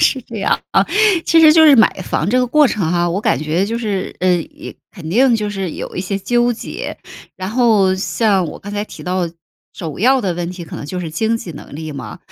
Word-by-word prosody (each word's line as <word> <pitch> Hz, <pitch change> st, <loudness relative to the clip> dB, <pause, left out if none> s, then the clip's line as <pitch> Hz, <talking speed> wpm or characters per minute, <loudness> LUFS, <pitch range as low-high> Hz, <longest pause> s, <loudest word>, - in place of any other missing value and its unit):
是 265 Hz, -, +3 dB
这 230 Hz, -, -10 dB
样 195 Hz, -, +1 dB
啊。 -, -, +4 dB, 0.4 s
其 330 Hz, -, +4 dB
实 310 Hz, -1 st, +8 dB
就 320 Hz, 0 st, +6 dB
是 295 Hz, -3 st, +8 dB
买 220 Hz, -, +6 dB
房 175 Hz, 0 st, -2 dB
这 255 Hz, -, +2 dB
个 250 Hz, -, +2 dB
过 295 Hz, +4 st, +4 dB
程 190 Hz, -9 st, -1 dB
哈， 175 Hz, 0 st, +1 dB
我 180 Hz, +4 st, -1 dB
感 135 Hz, -, +1 dB
觉 155 Hz, +5 st, 0 dB
就 230 Hz, +3 st, -3 dB
是 205 Hz, -5 st, -3 dB
呃， 185 Hz, -, +2 dB, 0.3 s
呃， -, -, -9 dB, 0.2 s
肯 170 Hz, -5 st, -10 dB
定 245 Hz, +7 st, +4 dB
就 210 Hz, -1 st, -2 dB
是 195 Hz, -3 st, -4 dB
有 -, -, -7 dB
一 -, -, -1 dB
些 195 Hz, +1 st, -3 dB
纠 240 Hz, +4 st, +1 dB
结。 230 Hz, -, -6 dB, 0.4 s
然 185 Hz, 0 st, -5 dB
后 220 Hz, -5 st, +3 dB
像 195 Hz, 0 st, +1 dB
我 150 Hz, -, -8 dB
刚 205 Hz, +1 st, -9 dB
才 205 Hz, 0 st, -2 dB
提 -, -, -11 dB
到 180 Hz, -1 st, -1 dB, 0.4 s
首 160 Hz, -4 st, -7 dB
要 260 Hz, +4 st, +4 dB
的 185 Hz, -6 st, -2 dB
问 175 Hz, 0 st, -4 dB
题， 180 Hz, -1 st, -8 dB
可 160 Hz, -, -10 dB
能 -, -, -7 dB
就 180 Hz, +5 st, -5 dB
是 165 Hz, -3 st, -5 dB
经 220 Hz, +6 st, 0 dB
济 180 Hz, -6 st, -8 dB
能 145 Hz, -, -11 dB
力 155 Hz, -1 st, -6 dB
嘛。 130 Hz, -6 st, -8 dB
195 Hz, 260 characters per minute, -17 LUFS, 175-230 Hz, 0.4 s, 实